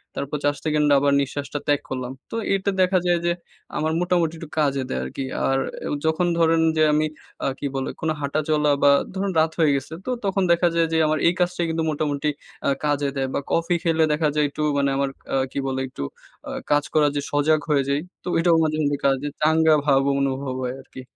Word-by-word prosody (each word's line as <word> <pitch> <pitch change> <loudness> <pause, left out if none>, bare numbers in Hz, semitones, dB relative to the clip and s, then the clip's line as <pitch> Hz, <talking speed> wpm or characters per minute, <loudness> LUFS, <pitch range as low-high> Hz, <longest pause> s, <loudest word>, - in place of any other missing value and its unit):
তারপর 140 +2 -3
৪ 145 0 +2
সেকেন্ড 150 -1 +2
আবার 140 +1 +3
নিঃশ্বাসটা 145 +1 -4
ত্যাগ 145 -1 +2
করলাম। 130 -1 -4 0.2
তো - - -4 0.2
এটা 195 +1 0
দেখা 185 0 +3
যায় 175 -1 +3
যে 175 - +3 0.5
আমার 155 +1 0
মোটামুটি 175 -2 +1
একটু 160 -1 -9
কাজে 140 -2 +1
দেয় 65 - -2
আরকি। 65 - -5 0.2
আর 135 - +2 0.3
আ - - -3 0.2
যখন 160 +3 +2
ধরেন 165 0 +4 0.2
যে 155 - +4
আমি 155 +1 +2 0.4
আ - - +2
কী - - -4
বলে? 135 0 -2
কোনো 160 0 0
হাঁটা 140 +2 -1
চলা 150 -1 +3
বা, 140 - +7 0.2
ধরুন 195 +1 -1
রাত 160 0 +3
হয়ে 155 -3 +4
গেছে। 140 +3 -4
তো - - -4 0.2
তখন 195 0 +1
দেখা 170 +1 +4
যায় 165 -1 +3
যে - - +3
আমার 155 0 +1
এই 170 - +4
কাজটা 180 0 0
কিন্তু 160 0 -1
মোটামুটি 150 -1 -1 0.4
আ - - +4 0.2
কাজে 145 -1 +1
দেয় 135 -1 -1
বা, - - 0
কফি 170 +1 +1
খেলে 165 -1 +2
দেখা 155 +1 +1
যায় 150 - +3
একটু 145 - -6 0.2
মানে 140 0 +2
আমার 140 0 0 0.4
কি - - -7
বলে? 130 0 -2
একটু 125 - -7 0.5
আ - - -5 0.2
কাজ 145 0 +4
করার 150 -2 +4
যে - - 0
সজাগ 150 +2 +3
হয়ে 140 -2 +3
যাই। 140 +1 +1 0.2
তো - - -10
এটাও 165 0 +4
মাঝেমধ্যে 155 -2 0
কাজ 135 -1 +4 0.2
চাঙ্গা 160 0 +4
ভাব 135 -2 +4 0.2
অনুভব 135 -1 -2
হয় 125 0 -3
আরকি। 130 - -11
150 Hz, 215 wpm, -23 LUFS, 140-165 Hz, 0.5 s, বা